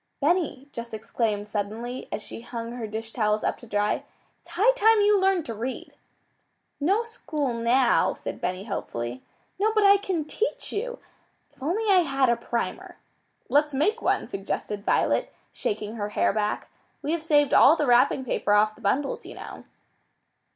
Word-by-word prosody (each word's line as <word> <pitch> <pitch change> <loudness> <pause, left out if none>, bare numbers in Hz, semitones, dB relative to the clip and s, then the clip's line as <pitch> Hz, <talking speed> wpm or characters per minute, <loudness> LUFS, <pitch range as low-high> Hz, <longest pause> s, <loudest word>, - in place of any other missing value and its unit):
"Benny," 300 -3 0
Jess 235 -1 -7
exclaimed 215 -1 -2
suddenly, 215 +4 -4
as 210 - -4
she - - -8
hung 230 -1 -6
her 240 -2 -5
dish 220 +1 -6
towels 215 -2 +1
up - - 0
to 240 - -13
dry, 205 0 0 0.4
"it's - - -23
high 425 +8 +4
time 450 -3 +4
you 410 -1 +4
learned 380 -4 +2
to 230 - -4
read." 240 +4 -5 0.9
"No 390 +10 +2
school 305 - -3
now," 235 +2 +3
said - - -7
Benny 185 +1 -2
hopefully. 120 - -4 0.4
"No, 430 +2 +3
but 430 - +4
I 400 0 +7
can 370 -6 -2
teach 445 +9 -3
you. 485 +4 -3 0.6
If - - -27
I 275 - -3
only 390 0 +3
had 270 -4 +2
a 235 - +4
primer!" 235 0 -4 0.5
"Let's 295 0 +2
make 415 - +1
one," - - +1
suggested 200 +1 -4
Violet, - - +1 0.2
shaking 215 +1 -3
her 205 -1 -3
hair 210 - +1
back. 210 0 -2 0.3
"We 295 - -1
have 335 -1 0
saved 295 -3 +3
all 295 - +7
the 300 - 0
wrapping 245 +1 +4
paper 205 -3 0
off 210 +1 +4
the - - -19
bundles, 265 +8 0
you - - -9
know." - - -9
255 Hz, 170 wpm, -26 LUFS, 215-340 Hz, 0.9 s, I